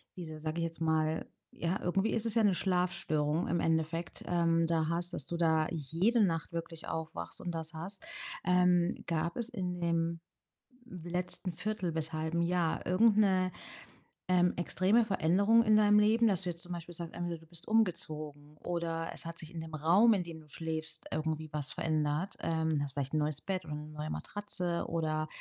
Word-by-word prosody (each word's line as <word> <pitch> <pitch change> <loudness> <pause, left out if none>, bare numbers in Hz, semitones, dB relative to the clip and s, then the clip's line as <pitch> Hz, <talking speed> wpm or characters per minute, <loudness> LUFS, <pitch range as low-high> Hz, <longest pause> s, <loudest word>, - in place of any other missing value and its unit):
diese, 160 -4 -7
sage 155 +2 -3
ich - - 0
jetzt 165 0 -4
mal 160 0 +1 0.3
ja, 170 +3 -1
irgendwie 195 +4 +1
ist 225 0 -1
es 225 - 0
ja 230 - +3
'ne 200 -3 +4
Schlafstörung 175 -4 0
im 170 - +1
Endeffekt, 165 +1 -1
ähm, 165 -1 +3
da 165 -1 +1
hast 175 +1 -1
dass 140 - -2
du 170 - -2
da 160 -2 +3
jede 175 - +2
Nacht 165 -4 0
wirklich 165 -1 -6
aufwachst 160 0 -5
und 175 - -3
das 160 0 -4
hast. 185 - -5 0.4
Ähm, 180 -1 +3
gab 170 0 -1
es 235 -1 -2
in 180 -7 -3
dem 170 -1 0 0.7
letzten 180 -1 -2
1/4 190 -1 -2
bis 160 0 -2
1/2 160 +2 -1
Jahr 170 -1 0
irgend 210 +4 +4
'ne, 185 -3 +3 0.8
ähm, 180 -1 +4
extreme 190 +6 +3
Veränderung 200 +4 +4
in 215 -1 +5
deinem 210 0 +6
Leben, 225 +2 +4
dass 195 -3 +2
du 180 - -2
jetzt 170 -1 -3
zum 175 0 -5
Beispiel 175 0 -7
sagst: 170 0 -6
Entweder 175 0 -3
du 165 - -17
bist 170 0 -8
umgezogen 155 -8 -1
oder 165 0 -2
es - - -8
hat 165 0 -6
sich 160 0 -9
in 165 - -4
dem 160 0 -8
Raum, 175 +10 +5
in 190 - 0
dem 165 -2 -9
du 155 - -18
schläfst, 160 +1 -4
irgendwie 155 0 -2
was 145 -3 -1
verändert. 155 +3 -1
Ähm, 160 -2 +1
hast 140 -2 -4
vielleicht 140 0 -3
'n 155 - +2
neues 150 -1 0
Bett 190 -2 -2
oder 150 - -5
'ne 150 0 -7
neue 150 0 -5
Matratze 180 -4 -2
oder, 155 -2 -1
170 Hz, 190 wpm, -32 LUFS, 160-185 Hz, 0.8 s, deinem